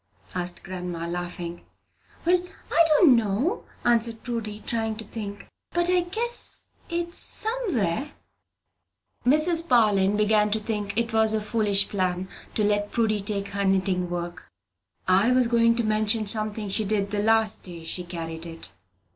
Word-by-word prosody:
asked 180 Hz, -1 st, -2 dB
grandma, 180 Hz, -3 st, -5 dB
laughing. 175 Hz, 0 st, -5 dB, 0.6 s
"Well, 355 Hz, +1 st, +3 dB, 0.3 s
I 335 Hz, -, +5 dB
don't 305 Hz, -3 st, +6 dB
know," 230 Hz, -, -1 dB, 0.2 s
answered 230 Hz, -1 st, +2 dB
Prudy, 225 Hz, -3 st, -4 dB
trying 225 Hz, -1 st, -2 dB
to 220 Hz, -, -8 dB
think; 205 Hz, -2 st, -7 dB, 0.3 s
"but 345 Hz, +1 st, +1 dB
I 365 Hz, -, +4 dB
guess 450 Hz, +7 st, 0 dB, 0.2 s
it's 340 Hz, 0 st, +1 dB
somewhere." 305 Hz, -, +2 dB, 1.2 s
Mrs. 325 Hz, +4 st, +3 dB
Parlin 205 Hz, -5 st, +3 dB
began 210 Hz, 0 st, +3 dB
to 215 Hz, +1 st, 0 dB
think 210 Hz, -2 st, -4 dB
it 230 Hz, -1 st, -1 dB
was 220 Hz, 0 st, +3 dB
a -, -, +1 dB
foolish 210 Hz, -2 st, +1 dB
plan 185 Hz, -2 st, -2 dB, 0.3 s
to 215 Hz, -, +1 dB
let 205 Hz, 0 st, +1 dB
Prudy 220 Hz, -3 st, +1 dB
take 200 Hz, 0 st, -2 dB
her 200 Hz, 0 st, -2 dB
knitting 190 Hz, -2 st, +1 dB
work. 175 Hz, -1 st, -6 dB, 0.6 s
I 195 Hz, +6 st, +4 dB
was 255 Hz, -1 st, +4 dB
going 230 Hz, 0 st, +3 dB
to 235 Hz, -, 0 dB
mention 215 Hz, 0 st, +1 dB
something 215 Hz, 0 st, +1 dB
she 200 Hz, +3 st, +1 dB
did 200 Hz, -1 st, -1 dB
the 205 Hz, -1 st, 0 dB
last 220 Hz, 0 st, +3 dB
day 170 Hz, -3 st, -9 dB
she 180 Hz, +2 st, -2 dB
carried 165 Hz, -1 st, -6 dB
it. 165 Hz, 0 st, -6 dB
215 Hz, 150 wpm, -25 LUFS, 195-235 Hz, 1.2 s, don't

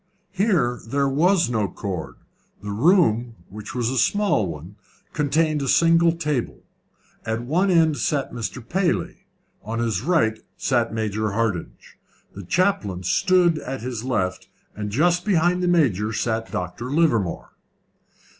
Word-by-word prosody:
Here 180 Hz, -, +1 dB
there 140 Hz, +3 st, +1 dB
was 170 Hz, +6 st, +3 dB
no 110 Hz, -4 st, 0 dB
cord. 90 Hz, -6 st, -6 dB, 0.5 s
The 105 Hz, -, -4 dB
room 120 Hz, -, +2 dB
which 105 Hz, +4 st, -9 dB
was 120 Hz, -2 st, 0 dB
a 130 Hz, -, 0 dB
small 205 Hz, -, +2 dB
one 85 Hz, +4 st, -8 dB, 0.4 s
contained 155 Hz, 0 st, +1 dB
a 135 Hz, -, -2 dB
single 165 Hz, +3 st, +4 dB
table. 150 Hz, -7 st, -3 dB, 0.6 s
At 110 Hz, +1 st, -3 dB
one 175 Hz, +10 st, +1 dB
end 160 Hz, -4 st, +3 dB
sat 140 Hz, +3 st, -1 dB
Mr. 120 Hz, 0 st, -5 dB
Paley, 185 Hz, +1 st, -1 dB, 0.3 s
on 115 Hz, +2 st, -5 dB
his 115 Hz, -5 st, -1 dB
right 130 Hz, -8 st, +1 dB, 0.2 s
sat 120 Hz, -4 st, 0 dB
Major 110 Hz, -1 st, -2 dB
Hardinge, 110 Hz, -6 st, -3 dB, 0.3 s
the 100 Hz, -, -8 dB
chaplain 100 Hz, -, 0 dB
stood 175 Hz, -, +3 dB
at 135 Hz, -3 st, -6 dB
his 120 Hz, -2 st, -5 dB
left, 95 Hz, -8 st, -2 dB, 0.3 s
and 105 Hz, 0 st, -4 dB
just 175 Hz, -, +2 dB
behind 180 Hz, -2 st, +2 dB
the 180 Hz, -, 0 dB
Major 120 Hz, -, +2 dB
sat 110 Hz, 0 st, -2 dB
Dr. 90 Hz, +7 st, -4 dB
Livermore. 130 Hz, -, 0 dB
125 Hz, 135 wpm, -23 LUFS, 110-165 Hz, 0.6 s, single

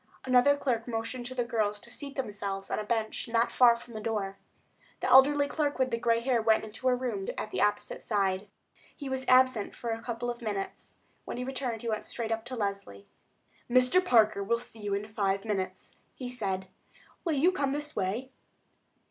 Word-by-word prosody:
Another 255 Hz, +3 st, +5 dB
clerk 245 Hz, -5 st, -1 dB
motioned 230 Hz, +1 st, -3 dB
to 255 Hz, -, -7 dB
the 245 Hz, -, +1 dB
girls 215 Hz, -3 st, 0 dB
to 235 Hz, -, -12 dB
seat 280 Hz, +1 st, -7 dB
themselves 200 Hz, -6 st, -4 dB
on -, -, 0 dB
a -, -, -2 dB
bench 220 Hz, +1 st, -1 dB
not 230 Hz, 0 st, +2 dB
far 240 Hz, -2 st, +6 dB
from 235 Hz, 0 st, -12 dB
the 215 Hz, -, -5 dB
door. 210 Hz, -3 st, -2 dB, 0.6 s
The -, -, -3 dB
elderly 285 Hz, +2 st, +6 dB
clerk 290 Hz, -1 st, -1 dB
with 260 Hz, -1 st, +1 dB
the 230 Hz, -, 0 dB
gray 230 Hz, 0 st, +2 dB
hair 245 Hz, -1 st, +2 dB
went 220 Hz, 0 st, +3 dB
into 220 Hz, +4 st, -4 dB
a 250 Hz, -, +4 dB
room 235 Hz, -6 st, -3 dB
at 215 Hz, -, -4 dB
the -, -, -1 dB
opposite 210 Hz, -, 0 dB
side. 195 Hz, -1 st, 0 dB, 0.5 s
He 280 Hz, -3 st, -6 dB
was 265 Hz, 0 st, -2 dB
absent 255 Hz, -4 st, +4 dB
for 235 Hz, -, -4 dB
a 225 Hz, 0 st, -3 dB
couple 240 Hz, 0 st, -3 dB
of 240 Hz, +1 st, -9 dB
minutes. 205 Hz, -4 st, -5 dB, 0.3 s
When -, -, -5 dB
he 250 Hz, -, -2 dB
returned 250 Hz, -3 st, -3 dB
he 230 Hz, -, -2 dB
went 215 Hz, -1 st, -2 dB
straight 230 Hz, -2 st, -4 dB
up 225 Hz, 0 st, -1 dB
to 255 Hz, +1 st, -5 dB
Leslie. 200 Hz, -, -3 dB, 0.6 s
"Mr. 255 Hz, +9 st, +4 dB
Parker 220 Hz, -, +4 dB
will 235 Hz, +4 st, +1 dB
see 230 Hz, -1 st, -11 dB
you 205 Hz, -1 st, -1 dB
in 205 Hz, +1 st, -3 dB
five 200 Hz, -1 st, -1 dB
minutes," 195 Hz, -4 st, -3 dB, 0.2 s
he 255 Hz, -, -6 dB
said. 195 Hz, -6 st, -3 dB, 0.6 s
"Will 330 Hz, -, 0 dB
you 310 Hz, +6 st, +4 dB
come 285 Hz, -7 st, 0 dB
this 295 Hz, +2 st, -4 dB
way?" 210 Hz, +7 st, -2 dB
230 Hz, 200 wpm, -30 LUFS, 210-255 Hz, 0.6 s, far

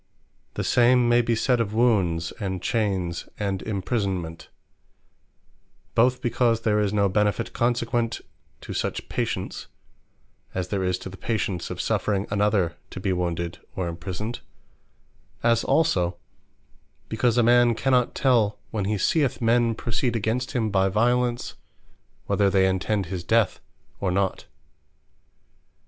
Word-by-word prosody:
The -, -, -2 dB
same 120 Hz, 0 st, +4 dB
may 120 Hz, 0 st, +5 dB
be 115 Hz, 0 st, 0 dB
sayd 125 Hz, +2 st, +2 dB
of 110 Hz, -2 st, -1 dB
Wounds, 95 Hz, -9 st, +2 dB
and 95 Hz, -3 st, -3 dB
Chayns, 95 Hz, -5 st, -1 dB
and 100 Hz, -2 st, -2 dB
Imprisonment; 95 Hz, -5 st, -3 dB, 1.4 s
both 125 Hz, +3 st, +2 dB
because 120 Hz, -1 st, +1 dB
there 105 Hz, -2 st, +2 dB
is 105 Hz, -2 st, +1 dB
no 100 Hz, -1 st, +2 dB
benefit 105 Hz, 0 st, 0 dB
consequent 120 Hz, -1 st, 0 dB, 0.4 s
to -, -, -7 dB
such -, -, -3 dB
patience; -, -, -3 dB, 0.9 s
as 90 Hz, -1 st, -2 dB
there 100 Hz, -2 st, -1 dB
is 90 Hz, 0 st, 0 dB
to -, -, -4 dB
the 95 Hz, -, -11 dB
patience 100 Hz, -6 st, -2 dB
of -, -, -6 dB
suffering 100 Hz, -2 st, 0 dB
another 100 Hz, -5 st, +1 dB
to -, -, -7 dB
be 95 Hz, 0 st, 0 dB
wounded, 85 Hz, -1 st, -2 dB, 0.2 s
or 95 Hz, -2 st, -2 dB
imprisoned: 90 Hz, +7 st, -5 dB, 1.0 s
as 115 Hz, -1 st, +3 dB
also 90 Hz, -, +2 dB, 0.9 s
because 115 Hz, +1 st, +1 dB
a 120 Hz, -, +5 dB
man 120 Hz, 0 st, +5 dB
cannot 125 Hz, 0 st, +1 dB
tell, 115 Hz, -6 st, +2 dB
when 105 Hz, -3 st, -2 dB
he 105 Hz, +1 st, 0 dB
seeth 135 Hz, -, +1 dB
men 115 Hz, -1 st, +2 dB
proceed 120 Hz, +1 st, -1 dB
against 115 Hz, +4 st, -1 dB
him 110 Hz, -4 st, 0 dB
by 95 Hz, 0 st, +3 dB
violence, 120 Hz, +3 st, +1 dB, 0.7 s
whether 100 Hz, -1 st, +2 dB
they 95 Hz, -1 st, +3 dB
intend 95 Hz, +2 st, 0 dB
his 90 Hz, 0 st, -5 dB
death 110 Hz, +3 st, +2 dB, 0.4 s
or 95 Hz, -, 0 dB
not. 95 Hz, +1 st, -1 dB
105 Hz, 135 wpm, -25 LUFS, 95-120 Hz, 1.4 s, may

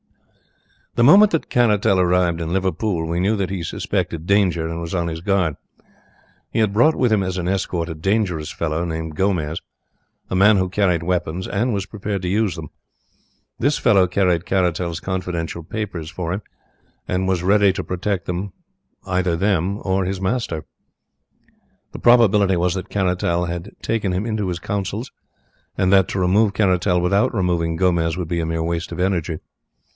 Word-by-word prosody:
"The 120 Hz, -, +3 dB
moment 195 Hz, -, +7 dB
that 165 Hz, -, -1 dB
Caratal 105 Hz, -5 st, +3 dB
arrived 90 Hz, -1 st, +2 dB
in 80 Hz, 0 st, -3 dB
Liverpool 95 Hz, -1 st, -1 dB
we 85 Hz, +1 st, -1 dB
knew 100 Hz, +4 st, +2 dB
that 95 Hz, -2 st, -2 dB
he 95 Hz, -3 st, -3 dB
suspected 80 Hz, 0 st, -3 dB
danger 90 Hz, -4 st, +2 dB
and 85 Hz, +1 st, -4 dB
was 85 Hz, +1 st, -5 dB
on 85 Hz, -1 st, 0 dB
his 80 Hz, 0 st, -5 dB
guard. 90 Hz, -5 st, +1 dB, 1.0 s
He -, -, -1 dB
had 105 Hz, -3 st, +2 dB
brought 155 Hz, +9 st, +4 dB
with 125 Hz, -4 st, +2 dB
him 100 Hz, -2 st, +2 dB
as 95 Hz, 0 st, -3 dB
an 90 Hz, -1 st, -2 dB
escort 90 Hz, -3 st, -1 dB
a 85 Hz, -, -4 dB
dangerous 90 Hz, -2 st, -1 dB
fellow, 80 Hz, 0 st, -2 dB
named 80 Hz, -2 st, -4 dB
Gomez, 85 Hz, -4 st, -1 dB, 0.7 s
a -, -, -2 dB
man 100 Hz, +2 st, +5 dB
who 95 Hz, -1 st, 0 dB
carried 90 Hz, -4 st, +1 dB
weapons, 90 Hz, 0 st, -2 dB
and 115 Hz, +5 st, 0 dB
was 100 Hz, -2 st, -2 dB
prepared 100 Hz, -1 st, -4 dB
to -, -, -2 dB
use 105 Hz, +1 st, +1 dB
them. 80 Hz, -4 st, -8 dB, 0.9 s
This 145 Hz, +4 st, +1 dB
fellow 100 Hz, -6 st, +4 dB
carried 90 Hz, -2 st, +1 dB
Caratal's 90 Hz, -3 st, 0 dB
confidential 85 Hz, -3 st, -4 dB
papers 90 Hz, -4 st, -5 dB
for 85 Hz, 0 st, -4 dB
him, 100 Hz, -, -3 dB, 0.7 s
and 95 Hz, +1 st, -1 dB
was 90 Hz, -2 st, 0 dB
ready 100 Hz, +1 st, +4 dB
to -, -, -4 dB
protect 90 Hz, 0 st, -3 dB, 0.8 s
either 90 Hz, -2 st, 0 dB
them 95 Hz, 0 st, +1 dB
or 95 Hz, 0 st, +1 dB
his 95 Hz, +1 st, -3 dB
master. 95 Hz, -5 st, -2 dB, 1.3 s
The -, -, -7 dB
probability 105 Hz, -6 st, +4 dB
was 85 Hz, 0 st, +1 dB
that 95 Hz, -1 st, -5 dB
Caratal 90 Hz, -3 st, 0 dB
had 85 Hz, +3 st, -5 dB
taken 105 Hz, -4 st, -1 dB
him 95 Hz, +4 st, -1 dB
into 110 Hz, -3 st, -2 dB
his 90 Hz, -1 st, -3 dB
counsel, 100 Hz, +5 st, -3 dB, 0.7 s
and 95 Hz, +1 st, +2 dB
that 95 Hz, -2 st, +5 dB
to 95 Hz, -, -2 dB
remove 100 Hz, +3 st, +3 dB
Caratal 95 Hz, -3 st, +2 dB
without 100 Hz, +4 st, +2 dB
removing 85 Hz, -4 st, 0 dB
Gomez 85 Hz, -1 st, +1 dB
would 90 Hz, -3 st, -3 dB
be 85 Hz, +1 st, -1 dB
a 80 Hz, -, -1 dB
mere 80 Hz, 0 st, -1 dB
waste 85 Hz, 0 st, -3 dB
of -, -, -6 dB
energy. 90 Hz, -3 st, 0 dB
90 Hz, 170 wpm, -21 LUFS, 85-100 Hz, 1.3 s, moment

